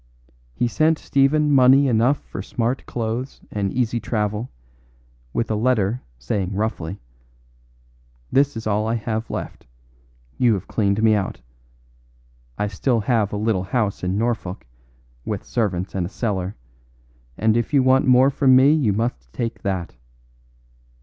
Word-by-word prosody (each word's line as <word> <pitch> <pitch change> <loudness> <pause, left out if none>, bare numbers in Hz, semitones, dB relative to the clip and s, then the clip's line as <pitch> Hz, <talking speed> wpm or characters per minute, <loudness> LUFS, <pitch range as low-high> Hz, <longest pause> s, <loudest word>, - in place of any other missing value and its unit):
He 120 - +1
sent 155 +6 +2
Stephen 145 +2 +2
money 135 +1 +6
enough 125 +4 +3
for - - -7
smart 125 +1 -2
clothes 120 +3 -4
and 100 -2 -1
easy 120 -1 0
travel, 105 +1 -2 0.8
with 115 - -1
a - - +1
letter 115 0 +1 0.2
saying 90 - -2
roughly: 100 -4 -3 1.3
'This 140 -2 +2
is 110 - -6
all 110 0 0
I 115 - 0
have 110 0 -3
left. - - -6 0.7
You 120 -3 +4
have 95 - -6
cleaned 100 0 0
me 110 -1 +5
out. 100 -3 -2 1.2
I 105 - 0
still 110 +4 0
have 110 -2 +1
a 105 - -3
little 105 -3 0
house 105 0 -1
in 90 +2 -1
Norfolk, 110 -4 -2 0.6
with - - -4
servants 95 -5 -2
and 90 -3 -1
a - - -10
cellar, 100 -4 -3 0.8
and 110 0 +2
if 120 +4 0
you 140 -3 +4
want 130 +1 +4
more 130 +2 +5
from 130 -1 +4
me 135 +3 +6
you 135 -10 +2
must 95 - -3
take 115 - -4
that. 95 - -3
110 Hz, 145 wpm, -22 LUFS, 100-125 Hz, 1.3 s, money